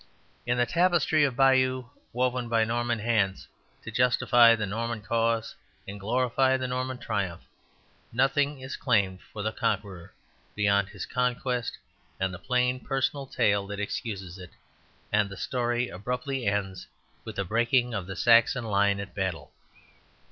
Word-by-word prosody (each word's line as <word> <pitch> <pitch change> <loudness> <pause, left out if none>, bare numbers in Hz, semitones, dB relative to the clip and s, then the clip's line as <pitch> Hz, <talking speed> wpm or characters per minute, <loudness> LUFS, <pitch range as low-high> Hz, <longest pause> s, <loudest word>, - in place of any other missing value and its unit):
In 120 0 +1
the 120 - +3
Tapestry 170 -2 +2
of 135 -4 -2
Bayeux, 130 -1 +3 0.2
woven 125 0 -1
by 115 -1 +3
Norman 120 +1 -1
hands 105 -4 0 0.4
to 115 - -7
justify 120 0 +5
the 110 -2 -2
Norman 110 +2 -3
cause 115 +1 0 0.3
and 100 +1 -7
glorify 130 +4 +2
the 130 -1 -3
Norman 130 0 -3
triumph, 100 -7 -3 0.7
nothing 135 +3 +1
is 130 +2 -6
claimed 100 -7 +1
for 105 - -8
the 110 - -1
Conqueror 100 -5 -3 0.4
beyond 100 -1 +2
his 100 -3 -7
conquest 125 -1 -1 0.4
and 95 -1 -1
the 90 - -8
plain 125 +2 0
personal 135 +1 -2
tale 100 -6 +1
that 100 0 -6
excuses 100 -3 -5
it, 90 -2 -10 0.6
and 105 -1 +3
the 100 - -9
story 120 -1 -1
abruptly 125 +5 -3
ends 95 -3 -2 0.4
with 110 - -8
the 100 - -2
breaking 120 +4 +1
of 95 -4 -3
the 95 - -6
Saxon 115 +3 +4
line 100 -2 +2
at 100 -1 -7
Battle. 95 -4 -3
115 Hz, 150 wpm, -27 LUFS, 100-125 Hz, 0.7 s, justify